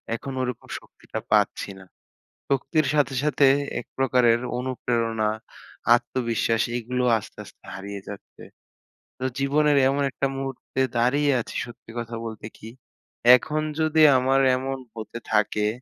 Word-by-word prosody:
এখন 135 +3 -6
ওই - - 0
রকম - - -16
শক্তিটা - - -9
পাচ্ছি - - +2
না। 95 - -13 0.7
শক্তির 140 +2 +1
সাথে, 140 -2 +2
সাথে 145 -2 +3 0.4
একপ্রকারের 125 -3 +2 0.2
অনুপ্রেরণা, 115 -4 -1 0.7
আত্মবিশ্বাস 120 -2 0
এগুলোও 125 +1 -1
আস্তে, - - -14
আস্তে - - -18
হারিয়ে 100 +1 -7
যাচ্ছে। 100 - -11 0.8
তো - - -5 0.2
জীবনের 145 +1 +3
এমন 140 +1 0
একটা 140 - -1
মুহূর্তে 135 0 -4 0.2
দাঁড়িয়ে 140 +5 +3
আছি - - -9
সত্যি 120 -2 -13
কথা 115 0 -5
বলতে 110 -1 -7
কি 110 - -9 0.7
এখন 155 +4 -3 0.2
যদি 155 0 +3 0.2
আমার 135 +1 +3 0.2
এমন 135 +1 -3 0.2
হতে 115 +1 -7
থাকে, 105 0 +2
125 Hz, 130 wpm, -24 LUFS, 115-135 Hz, 0.8 s, সাথে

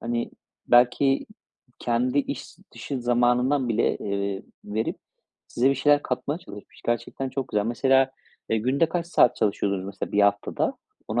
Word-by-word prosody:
hani, 120 +1 -2 0.4
belki 125 +3 +4 0.5
kendi 125 +3 0
iş 140 - -4 0.2
dışı 135 -3 -5
zamanından 125 +2 +2
bile, 115 0 +1
eee, 100 -1 -3 0.2
verip 110 +2 -2 0.5
size 130 +3 +2
bir 140 - +2
şeyler 145 +2 +3
katmaya 140 +4 -2
çalışmış. 105 - -13
Gerçekten 120 +3 -2
çok 130 0 -4
güzel. 105 0 0
Mesela, 135 +3 +3 0.4
eee, 110 - +2
günde 135 +8 +1
kaç 170 0 -2
saat 125 -8 +4
çalışıyordunuz 100 -2 0
mesela 100 - -6
1 105 - +4
haftada? 100 - +1 0.3
Onu - - 0
120 Hz, 145 wpm, -25 LUFS, 110-135 Hz, 0.5 s, belki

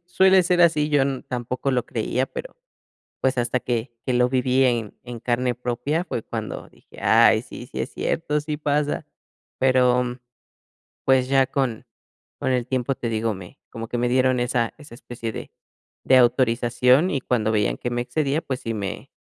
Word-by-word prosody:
suele, 190 +1 +5
ser 180 0 +2
así, 155 -3 +3
yo 145 -3 +3 0.2
tampoco 125 +2 -3
lo 125 -2 0
creía, 125 +3 -1
pero, - - -8 0.6
pues, 130 -1 +1
hasta 120 +1 0
que 120 0 -2
que 130 - +1
lo 125 0 +3
viví 130 +1 +2
en 120 -4 0
en 120 -1 -8
carne 125 +1 0
propia, 125 +7 -2
fue 140 -9 -4
cuando - - -6
dije: - - -20
"Ay, - - +5
sí - - -10
sí - - -8
es - - -3
cierto, 150 -2 -1
sí 150 0 -4
pasa". 145 0 -1 0.5
Pero, 125 -1 +4
mm, 125 +1 -5 0.9
pues, 130 -1 +3
ya 135 0 +4
con 130 -4 -2 0.5
con - - 0
el 125 -1 0
tiempo, 130 +1 0
te 120 - -4
digo, 110 0 -1
me 95 +7 -11
como 115 -1 -7
que 120 - -3
me 120 +1 +1
dieron 130 0 +2
esa 120 -1 0
esa 145 -6 -13
especie 120 -2 -6
de - - -8 0.5
de 130 - +6
autorización, 125 +4 +3
y 135 - -1
cuando 110 -4 0
veían 105 -2 +1
que 120 - -3
me 120 0 -1
excedía, 140 +5 -1
pues, 130 -5 -4
sí 115 - -3
me 100 -3 -5
125 Hz, 180 wpm, -23 LUFS, 120-135 Hz, 0.9 s, de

